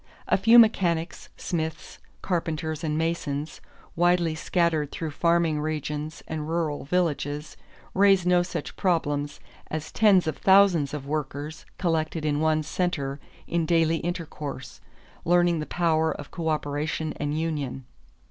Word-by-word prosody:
A - - +4
few 225 +5 +6
mechanics, 175 -7 +3
smiths, 160 -2 -4 0.2
carpenters, 160 -3 -2
and 155 -1 -1
masons, 160 -2 -2 0.3
widely 175 -1 +3
scattered 160 -2 0
through 160 -2 -4
farming 170 -1 +1
regions 150 0 -4
and 155 -1 -4
rural 160 -4 -1
villages, 150 -3 -1 0.4
raise 195 -2 +4
no 180 0 +4
such 175 - -5
problems 145 -5 -1 0.3
as 155 0 -4
tens 200 -5 +4
of 155 - -2
thousands 190 -7 +4
of 140 -2 -6
workers 150 +1 -4
collected 160 -2 -1
in 145 -1 +1
one 155 0 +2
center 150 -4 -2 0.3
in 170 -2 -1
daily 165 -1 +3
intercourse, 150 -6 -6 0.4
learning 175 -1 +3
the 150 - -4
power 160 -2 +1
of 145 - -8
coöperation 155 -1 -2
and 145 +1 -2
union. 145 -5 -3
160 Hz, 130 wpm, -26 LUFS, 150-175 Hz, 0.4 s, few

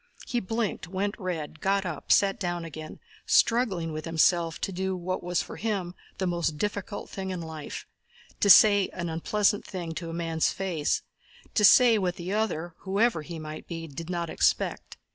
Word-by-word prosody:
He 245 - -1
blinked, 225 -2 -2
went 195 +3 -2
red, 165 -5 -4
got 195 0 +1
up 165 -5 -5
and - - -3
sat 195 -1 +4
down 175 -2 -2
again, 155 -1 -8 0.3
struggling 215 -9 +3
with 155 0 -5
himself 165 0 +2
to - - -2
do 190 +1 -2
what 185 +1 -3
was 175 0 -1
for - - -9
him 200 -5 -2 0.2
the 190 - -1
most 170 -3 -1
difficult 205 +2 -3
thing 190 -1 -5
in 185 -1 -3
life—to 160 +5 -6
say 205 0 +8
an 170 -2 -4
unpleasant 205 +5 +1
thing 175 -4 -5
to 165 +1 -5
a - - -5
man's 165 -1 0
face, 175 -6 -1 0.5
to 210 - +2
say 230 +1 +7
what 180 -2 -1
the 180 +3 -4
other, 175 -6 -1
whoever 200 -1 +1
he 165 +2 -7
might 155 0 -8
be, 165 -1 -5
did 160 +3 -8
not 170 -2 -2
expect. - - 0
180 Hz, 180 wpm, -27 LUFS, 165-200 Hz, 0.5 s, say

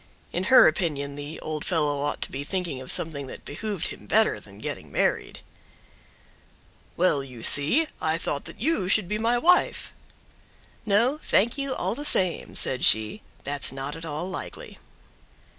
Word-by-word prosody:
In 180 +2 -2
her 255 +5 +7
opinion 150 -4 -1
the 145 +2 -7
old 155 -1 -4
fellow 150 -5 0
ought 145 - -1
to - - -3
be 135 +1 -5
thinking 170 -5 -4
of 130 - -1
something 145 -4 -1
that - - -10
behooved 200 +4 -3
him - - -11
better - - +3
than - - -16
getting - - -6
married. - - -1 1.6
"Well, 165 -6 +2
you 125 -4 -11
see, 160 - +4 0.2
I 160 0 +1
thought 145 -4 -4
that - - -10
you 260 - 0
should 205 -2 +2
be 210 +3 -2
my 230 +2 +1
wife!" 355 +8 +3 0.9
"No, 235 +9 +2
thank 225 +5 +2
you 275 -2 -3
all - - -2
the 285 +5 -6
same," 185 - 0
said 130 - -1
she, 110 - +6 0.2
"that's 140 -1 -1
not 135 +2 -5
at 165 - -9
all 160 +2 -4
likely." 190 - -7
165 Hz, 165 wpm, -25 LUFS, 145-210 Hz, 1.6 s, her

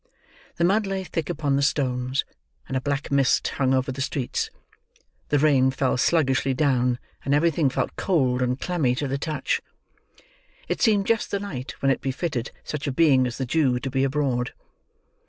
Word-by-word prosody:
The 170 - -1
mud 200 +4 +3
lay 195 -1 -2
thick 165 -3 -4
upon 145 -5 0
the - - +1
stones, 130 -2 0 0.4
and 130 - -4
a 130 - 0
black 140 +1 -2
mist 140 -1 +3
hung 130 -2 0
over 130 +1 +1
the 135 +1 -5
streets; 135 -2 -2 0.8
the 145 - +3
rain 140 -3 +4
fell 130 0 0
sluggishly 135 -1 +2
down, 125 -3 +2 0.3
and 140 +1 +2
everything 160 -1 +2
felt 130 - -2
cold 130 -9 +1
and 125 +1 0
clammy 155 -9 0
to 145 +2 -2
the 135 +1 -2
touch. 155 +1 -1 1.1
It - - -2
seemed 210 -4 +3
just 225 0 +1
the 200 - -1
night 140 -11 -6
when 135 - +4
it 135 - -1
befitted 135 -2 -2
such 150 -1 -4
a - - 0
being 130 -3 +4
as 120 - -5
the 130 - -2
Jew 130 -2 +2
to 135 +1 -4
be 135 +1 +1
abroad. 135 -3 0
140 Hz, 180 wpm, -24 LUFS, 130-155 Hz, 1.1 s, rain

